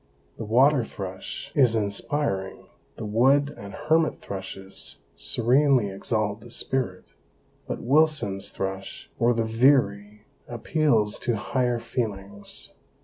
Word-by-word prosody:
The 115 Hz, -, -5 dB
water 130 Hz, +5 st, +4 dB
thrush 95 Hz, -4 st, -7 dB
is 125 Hz, -5 st, +4 dB
inspiring, 100 Hz, -1 st, -2 dB, 0.3 s
the 110 Hz, -, -6 dB
wood 135 Hz, +7 st, +3 dB
and 100 Hz, 0 st, -9 dB
hermit 155 Hz, +2 st, +2 dB
thrushes 95 Hz, 0 st, -8 dB, 0.2 s
'serenely 125 Hz, -2 st, +2 dB
exalt 105 Hz, +1 st, -2 dB
the 120 Hz, -, -12 dB
spirit,' 120 Hz, -6 st, -2 dB, 0.5 s
but -, -, -4 dB
Wilson's 135 Hz, -8 st, +2 dB
thrush 95 Hz, 0 st, -5 dB
or 120 Hz, +1 st, +4 dB
the 115 Hz, -1 st, 0 dB
veery 110 Hz, -4 st, +2 dB, 0.2 s
appeals 120 Hz, -3 st, +1 dB
to 120 Hz, -, 0 dB
higher 125 Hz, +3 st, 0 dB
feelings. 100 Hz, -4 st, -5 dB
115 Hz, 110 wpm, -25 LUFS, 100-135 Hz, 0.5 s, water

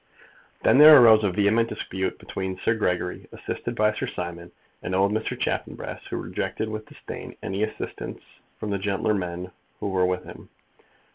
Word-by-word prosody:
Then 130 Hz, -, +5 dB
there 150 Hz, -1 st, +11 dB
arose 110 Hz, -3 st, +7 dB
a 100 Hz, -, +2 dB
vehement 105 Hz, +4 st, +2 dB
dispute 95 Hz, -4 st, -3 dB
between 95 Hz, -1 st, -5 dB
Sir 115 Hz, -, +1 dB
Gregory, 90 Hz, -5 st, -2 dB
assisted -, -, -5 dB
by 105 Hz, 0 st, +3 dB
Sir -, -, -3 dB
Simon, 85 Hz, -1 st, -6 dB, 0.3 s
and 95 Hz, -, -3 dB
old 100 Hz, +2 st, +3 dB
Mr. 110 Hz, +1 st, -2 dB
Chaffanbrass, -, -, -3 dB
who -, -, -4 dB
rejected 110 Hz, -, -3 dB
with 110 Hz, 0 st, -6 dB
disdain -, -, -9 dB
any 95 Hz, +1 st, -3 dB
assistance 110 Hz, 0 st, -4 dB, 0.4 s
from 105 Hz, -, -4 dB
the 100 Hz, -, -1 dB
gentler 100 Hz, +2 st, 0 dB
men 90 Hz, -2 st, -4 dB, 0.3 s
who -, -, -2 dB
were 95 Hz, -1 st, +2 dB
with 90 Hz, 0 st, -1 dB
him. -, -, -12 dB
100 Hz, 165 wpm, -25 LUFS, 90-110 Hz, 0.4 s, there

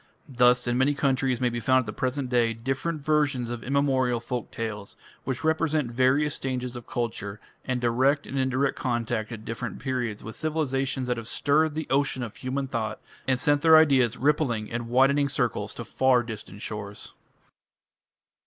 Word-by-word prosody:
Thus 125 Hz, -1 st, +4 dB
in 120 Hz, +1 st, 0 dB
many 140 Hz, +2 st, +3 dB
countries 135 Hz, -3 st, +1 dB
may 125 Hz, -, +2 dB
be 120 Hz, 0 st, -3 dB
found 130 Hz, +3 st, +3 dB
at -, -, -8 dB
the 105 Hz, -, -5 dB
present 130 Hz, +1 st, -2 dB
day 120 Hz, -2 st, +2 dB
different 135 Hz, +7 st, -3 dB
versions 140 Hz, -5 st, +1 dB
of 120 Hz, -1 st, -5 dB
immemorial 130 Hz, -3 st, +1 dB
folk 120 Hz, 0 st, -4 dB
tales, 105 Hz, -3 st, -5 dB, 0.3 s
which 130 Hz, +2 st, -3 dB
represent 155 Hz, -4 st, +1 dB
various 130 Hz, +4 st, +2 dB
stages 125 Hz, -2 st, -3 dB
of 120 Hz, -1 st, -8 dB
culture, 105 Hz, -4 st, -3 dB, 0.3 s
and 125 Hz, -1 st, -1 dB
direct 130 Hz, +5 st, +2 dB
and -, -, -7 dB
indirect 130 Hz, +1 st, +1 dB
contact 120 Hz, -2 st, -2 dB
at 110 Hz, -2 st, -8 dB
different 115 Hz, -, -5 dB
periods 125 Hz, -5 st, -3 dB
with 110 Hz, -, -7 dB
civilizations 135 Hz, -4 st, -1 dB
that 125 Hz, -1 st, 0 dB
have 115 Hz, -1 st, -6 dB
stirred 150 Hz, +4 st, +1 dB
the 160 Hz, -1 st, -2 dB
ocean 135 Hz, -2 st, +1 dB
of 115 Hz, -, -7 dB
human 135 Hz, +1 st, -3 dB
thought, 110 Hz, -4 st, -3 dB, 0.3 s
and 130 Hz, -1 st, +2 dB
sent 145 Hz, +2 st, +2 dB
their 160 Hz, 0 st, +8 dB
ideas 130 Hz, -6 st, +4 dB
rippling 130 Hz, -6 st, +1 dB
in 120 Hz, 0 st, -4 dB
widening 135 Hz, +4 st, +3 dB
circles -, -, -1 dB
to -, -, -6 dB
far 130 Hz, -2 st, +3 dB
distant 110 Hz, -2 st, -8 dB
shores. 105 Hz, -1 st, -7 dB
130 Hz, 170 wpm, -26 LUFS, 120-140 Hz, 0.3 s, their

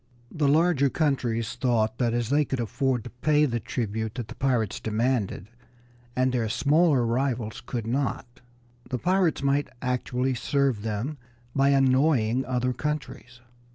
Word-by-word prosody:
The 150 Hz, -3 st, 0 dB
larger 150 Hz, -1 st, +3 dB
countries 125 Hz, -7 st, 0 dB
thought 115 Hz, -3 st, 0 dB
that, 120 Hz, -2 st, +2 dB
as 120 Hz, 0 st, -1 dB
they 150 Hz, +1 st, +4 dB
could 135 Hz, -2 st, -3 dB
afford 125 Hz, +1 st, -1 dB
to 125 Hz, -, -9 dB
pay 150 Hz, +4 st, +2 dB
the 120 Hz, -4 st, -1 dB
tribute 110 Hz, -2 st, -3 dB
that 120 Hz, -4 st, -5 dB
the -, -, -6 dB
pirates 125 Hz, -6 st, 0 dB
demanded, 110 Hz, -3 st, -1 dB, 0.6 s
and 130 Hz, 0 st, +2 dB
their 120 Hz, -3 st, 0 dB
smaller 145 Hz, +2 st, +3 dB
rivals 120 Hz, -2 st, -1 dB
could 120 Hz, -4 st, -4 dB
not, 125 Hz, 0 st, -3 dB, 0.5 s
the 125 Hz, -, -1 dB
pirates 180 Hz, 0 st, +1 dB
might 140 Hz, +1 st, +1 dB
actually 125 Hz, 0 st, -1 dB
serve 135 Hz, -2 st, 0 dB
them 115 Hz, +7 st, -3 dB, 0.4 s
by 135 Hz, 0 st, +4 dB
annoying 130 Hz, -3 st, +3 dB
other 125 Hz, 0 st, 0 dB
countries. 125 Hz, -3 st, -5 dB
125 Hz, 145 wpm, -26 LUFS, 115-140 Hz, 0.6 s, they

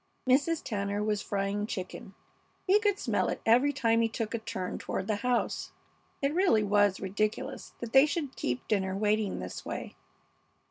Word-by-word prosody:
Mrs. 285 Hz, +5 st, +3 dB
Tanner 205 Hz, -1 st, -2 dB
was 210 Hz, -1 st, 0 dB
frying 200 Hz, +1 st, -2 dB
chicken. 190 Hz, -1 st, -6 dB, 0.5 s
He 400 Hz, +2 st, +5 dB
could 410 Hz, -2 st, +1 dB
smell -, -, 0 dB
it -, -, -3 dB
every 250 Hz, +6 st, +5 dB
time 230 Hz, -5 st, +2 dB
he 225 Hz, -, +2 dB
took 225 Hz, 0 st, -3 dB
a 230 Hz, -, -1 dB
turn 190 Hz, -4 st, -4 dB
toward -, -, -3 dB
the 210 Hz, 0 st, 0 dB
house. 245 Hz, +2 st, -1 dB, 0.5 s
It 280 Hz, +1 st, +2 dB
really 345 Hz, -, +3 dB
was 205 Hz, -1 st, +3 dB
ridiculous 215 Hz, +7 st, -2 dB
that 235 Hz, -1 st, -6 dB
they 270 Hz, +2 st, +8 dB
should 290 Hz, -2 st, -3 dB
keep 125 Hz, 0 st, -3 dB
dinner 190 Hz, -2 st, 0 dB
waiting 210 Hz, -1 st, +1 dB
this -, -, -6 dB
way. -, -, -6 dB
220 Hz, 170 wpm, -30 LUFS, 205-265 Hz, 0.5 s, they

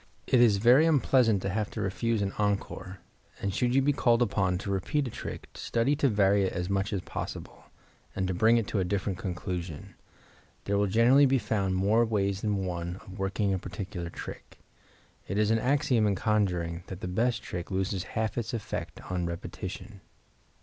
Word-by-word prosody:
It 125 Hz, -, +4 dB
is 110 Hz, -5 st, +5 dB
very 125 Hz, +9 st, +6 dB
unpleasant 125 Hz, -, +3 dB
to 95 Hz, -, -1 dB
have 105 Hz, +1 st, -1 dB
to -, -, -7 dB
refuse 110 Hz, +2 st, 0 dB
an 100 Hz, -, -2 dB
encore; 100 Hz, -2 st, -2 dB, 0.4 s
and 100 Hz, -1 st, -2 dB
should 125 Hz, +4 st, +1 dB
you 135 Hz, -, +4 dB
be 145 Hz, +1 st, +3 dB
called 120 Hz, -3 st, +3 dB
upon 100 Hz, -4 st, 0 dB
to 100 Hz, +2 st, -4 dB
repeat 135 Hz, -, 0 dB
a -, -, -6 dB
trick -, -, -7 dB
study 120 Hz, +5 st, 0 dB
to 140 Hz, -2 st, +3 dB
vary 100 Hz, -2 st, +3 dB
it -, -, -2 dB
as 90 Hz, +2 st, -3 dB
much 100 Hz, 0 st, 0 dB
as 100 Hz, -3 st, -1 dB
possible, -, -, -7 dB, 0.5 s
and 95 Hz, -, -1 dB
to 95 Hz, -, -1 dB
bring 110 Hz, +6 st, +4 dB
it 115 Hz, -, 0 dB
to 105 Hz, -, 0 dB
a -, -, +2 dB
different 95 Hz, 0 st, -2 dB
conclusion. 90 Hz, -4 st, -5 dB, 0.7 s
There 100 Hz, -, -1 dB
will 100 Hz, 0 st, +2 dB
generally 120 Hz, +8 st, +5 dB
be 135 Hz, +1 st, +3 dB
found 100 Hz, -4 st, -1 dB
more 105 Hz, +5 st, +3 dB
ways 100 Hz, -3 st, 0 dB
than 100 Hz, -3 st, -1 dB
one 85 Hz, -1 st, -3 dB
of 95 Hz, +1 st, -11 dB
working 95 Hz, +1 st, 0 dB
a 95 Hz, -, -1 dB
particular 95 Hz, -3 st, -6 dB
trick. -, -, -9 dB, 0.7 s
It 95 Hz, -, -2 dB
is 105 Hz, 0 st, +3 dB
an 115 Hz, -, +3 dB
axiom 130 Hz, -3 st, +2 dB
in 100 Hz, -, +1 dB
conjuring 90 Hz, -6 st, 0 dB
that 95 Hz, -1 st, -8 dB
the -, -, -3 dB
best 110 Hz, +4 st, 0 dB
trick 90 Hz, -1 st, -5 dB
loses 95 Hz, 0 st, -1 dB, 0.2 s
half 110 Hz, +1 st, 0 dB
its 120 Hz, +1 st, -3 dB
effect 110 Hz, -, -5 dB
on 90 Hz, -2 st, -1 dB
repetition. 95 Hz, +4 st, -7 dB
100 Hz, 190 wpm, -28 LUFS, 95-115 Hz, 0.7 s, very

